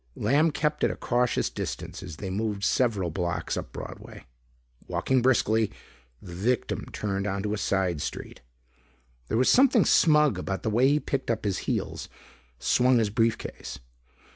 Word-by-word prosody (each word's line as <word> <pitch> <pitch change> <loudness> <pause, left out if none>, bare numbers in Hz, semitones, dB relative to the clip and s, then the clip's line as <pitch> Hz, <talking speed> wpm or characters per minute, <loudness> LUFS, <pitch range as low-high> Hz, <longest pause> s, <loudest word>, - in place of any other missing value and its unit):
Lamb 150 +4 +3
kept 150 0 -1
at - - +4
a - - -3
cautious 125 0 0
distance - - -5
as 90 -4 -8
they 95 +4 -6
moved 105 0 -2
several 105 -8 +1
blocks 85 0 -2
up - - -5
Broadway. - - -9 0.6
Walking 130 -1 +1
briskly, 110 -4 +2 0.5
the 90 +2 -11
victim 110 +8 -1
turned 100 -1 -2
into 100 +1 -2
a - - -1
side 95 -6 0
street. - - -6 0.9
There - - 0
was 125 - +3
something 255 -5 +5
smug 150 - +4
about 95 +1 -4
the 110 - 0
way 120 +5 +4
he 145 +2 +3
picked 135 -4 -3
up 110 -2 -1
his 95 -2 0
heels, - - -3 0.5
swung 125 - +3
his 110 -3 +1
briefcase. 115 +1 -2
110 Hz, 155 wpm, -27 LUFS, 95-130 Hz, 0.9 s, something